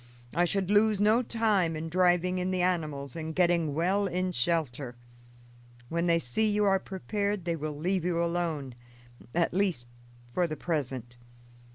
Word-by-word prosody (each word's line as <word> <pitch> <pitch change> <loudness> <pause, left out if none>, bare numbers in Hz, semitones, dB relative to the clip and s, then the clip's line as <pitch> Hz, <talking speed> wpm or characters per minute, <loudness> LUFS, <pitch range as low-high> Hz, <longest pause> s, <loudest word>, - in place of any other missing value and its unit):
I 175 +2 +3
should 195 +1 -1
lose 210 0 +4
no 215 +4 +4
time 215 -8 +1
in 155 +1 -4
driving 180 +1 +2
in 180 +1 -1
the 185 -1 0
animals 150 -7 -1
and 160 -1 -5
getting 170 -5 +2
well 190 +5 +1
in 185 +1 -1
shelter. 140 -4 -1 0.9
When 170 +1 0
they 170 -1 +4
see 165 - 0
you 210 0 +2
are 195 -1 +4
prepared 200 0 -3
they 170 -1 0
will 155 -1 -4
leave 180 +3 0
you 175 -1 0
alone; 165 -6 -2 0.6
at 170 -1 +2
least, 185 -10 0 0.5
for 175 +7 +1
the 155 -1 -5
present. 130 -7 -3
175 Hz, 160 wpm, -29 LUFS, 155-190 Hz, 0.9 s, lose